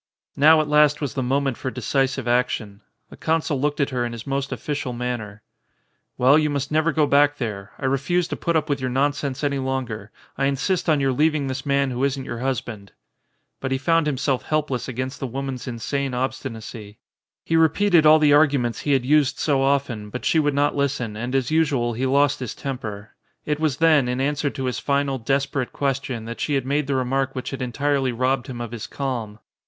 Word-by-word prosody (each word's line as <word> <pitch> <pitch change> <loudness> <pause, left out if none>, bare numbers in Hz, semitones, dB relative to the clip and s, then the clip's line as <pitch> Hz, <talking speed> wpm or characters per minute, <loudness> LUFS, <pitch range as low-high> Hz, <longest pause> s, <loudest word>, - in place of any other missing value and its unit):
Now 155 +2 +6
at 155 - -3
last 150 0 +4
was 140 -6 -3
the 130 - -2
moment 135 0 0
for 130 - -3
decisive 130 +1 -1
action. 120 -4 0 0.3
The - - -11
consul 160 -4 0
looked 145 +1 0
at 140 -1 +1
her 125 -1 -1
in 120 -1 -3
his 115 -1 -8
most 140 0 -2
official 145 -4 -3
man 125 0 -2
ner. 105 -1 -10 0.7
"Well, 135 +5 +5
you 150 -1 +1
must 140 0 -2
never 155 +2 +2
go 155 -1 +2
back 145 0 +3
there. 105 -5 -5
I 135 - -5
refuse 140 +7 +1
to - - -2
put 170 -1 -1
up 155 -1 +1
with 140 -3 -1
your 130 - -1
nonsense 140 +1 -1
any 140 -1 0
longer. 125 -6 -3 0.3
I 135 - +2
in 140 0 +1
sist 180 +5 -1
on 155 -2 +4
your 135 -1 +2
leaving 150 +2 +1
this 130 +1 -4
man 140 -1 +2
who 125 +2 -2
isn't 135 -1 -1
your 120 - -5
hus 130 0 0
band." 105 -4 -10 0.7
But 130 - -4
he 135 - +2
found 165 +3 +2
himself 140 -2 0
helpless 150 -5 -1
against 130 +1 -4
the 135 - -3
wo 135 +3 -4
man's 135 -1 -5
insane 130 +2 -2
obstinacy. 115 -4 -5 0.5
He 165 - 0
repeated 165 +2 +4
all 155 0 +8
the 150 -1 +4
argu 145 -1 +5
ments 120 -1 -2
he 145 - 0
had 130 -2 +1
used 145 0 +3
so 140 -3 +1
often, 135 -6 0
but 125 - -6
she 160 - +3
would 145 -2 +1
not 145 +1 +2
120 - - -4
THE 140 - +4
CONSUL 125 -5 -4
listen, 105 +2 -6
and 125 +2 -3
as 135 +1 0
usual 145 -7 +1
he 130 +4 -1
lost 140 +2 +3
his 125 -4 -5
temper. 110 -7 -6 0.3
It 150 0 -1
was 155 -4 0
then, 155 -5 +4
in 125 +1 -1
answer 145 +1 0
to 135 -1 -5
his 125 - -2
final, 140 -1 0
desperate 135 +1 -1
question, 135 -4 -2
that 115 +1 -7
she 145 - 0
had 135 -2 0
made 140 +1 0
the 140 - 0
remark 135 +1 0
which 130 - -4
had 135 - -5
entirely 135 +1 0
robbed 130 +1 0
him 125 -2 -6
of 120 -2 -5
his 115 -2 -6
calm. 120 -7 -4
135 Hz, 225 wpm, -23 LUFS, 125-145 Hz, 0.7 s, all